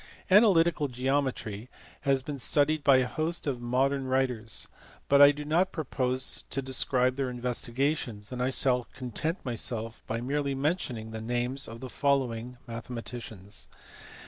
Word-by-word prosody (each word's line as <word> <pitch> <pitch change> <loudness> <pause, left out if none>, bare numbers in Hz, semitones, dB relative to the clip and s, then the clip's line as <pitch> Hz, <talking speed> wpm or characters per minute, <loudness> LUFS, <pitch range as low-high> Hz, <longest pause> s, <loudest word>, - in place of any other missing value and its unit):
Analytical 170 -7 +5
Geometry 125 -4 -2 0.4
has 135 -1 +3
been 140 0 -5
studied 145 +4 +2
by 135 -2 +6
a 130 - +2
host 160 +5 -1
of 130 -4 -2
modern 130 +3 0
writers, 125 -4 0 0.4
but 140 0 +5
I 145 0 +10
do 145 +1 -7
not 170 +5 +2
propose 130 -4 0
to 135 - -1
describe 130 -1 +2
their 135 -2 -1
investigations, 125 -2 -2
and 125 -1 -4
I 125 - +1
shall 125 -2 +2
content 130 - -3
myself 115 -2 -3
by 115 - -2
merely 140 +2 -1
mentioning 135 -7 -2
the 110 0 -6
names 120 +4 -1
of 115 +1 -9
the 130 - -5
following 125 -3 0
mathematicians. 115 -4 -5
130 Hz, 145 wpm, -29 LUFS, 120-140 Hz, 0.4 s, I